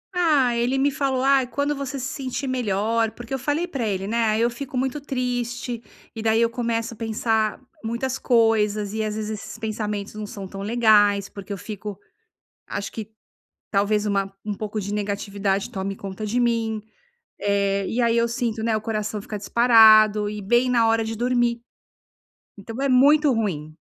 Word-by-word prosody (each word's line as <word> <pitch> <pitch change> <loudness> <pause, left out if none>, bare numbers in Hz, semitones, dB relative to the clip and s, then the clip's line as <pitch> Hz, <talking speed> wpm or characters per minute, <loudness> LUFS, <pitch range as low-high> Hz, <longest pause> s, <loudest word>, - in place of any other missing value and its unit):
Ah, 290 -9 +3
ele 245 +3 +1
me 280 +1 +2
falou: 270 -2 0
"Ah, 270 -1 +4
quando 285 +5 -1
você 275 -1 -4
se 255 - -3
sentir 270 0 -4
melhor" 225 -2 0
porque 240 +2 -9
eu 265 - -1
falei 290 +6 0
para 250 -8 -3
ele, 195 -1 -2
né. 230 +3 -2
Aí 220 +1 +2
eu 235 - +3
fico 255 +2 -6
muito 265 +3 -1
triste, 245 -3 -3 0.3
e 225 - -5
daí 220 0 +2
eu 230 0 +2
começo 230 -1 -2
a - - -14
pensar 220 -1 0 0.2
muitas 240 +3 -2
coisas 215 -3 +2
e 220 0 -1
às 215 0 -2
vezes 215 0 -3
esses 215 +1 -7
pensamentos 210 -2 -4
não 210 0 -6
são 200 -3 -7
tão 195 +1 -8
legais, 205 -2 +4
porque 200 0 -10
eu 200 - -3
fico 205 0 -7 0.7
Acho 200 - -5
que 220 -1 -7 0.6
talvez 210 +1 +1
uma 195 -1 0
um 210 -1 -2
pouco 215 +1 -4
de 200 +1 -5
negatividade, 200 -1 -1
tome 195 0 -3
conta 195 +2 -6
de 225 +4 -1
mim, 230 -2 0 0.6
eh, 200 -1 +1
e 240 - -2
aí 235 -1 +3
eu 235 - +3
sinto, 235 -2 -2
né, 225 -1 +1
o 215 - -5
coração 215 -1 -3
fica 210 +1 -6
disparado 215 -1 +6
e 210 0 -6
bem 240 +5 +3
na 235 -2 +3
hora 225 0 +2
de 225 - -4
dormir. 240 0 +1 1.0
Então 225 +3 -8
é 275 - +1
muito 285 +3 +5
ruim. 160 -10 -2
225 Hz, 185 wpm, -23 LUFS, 210-245 Hz, 1.0 s, disparado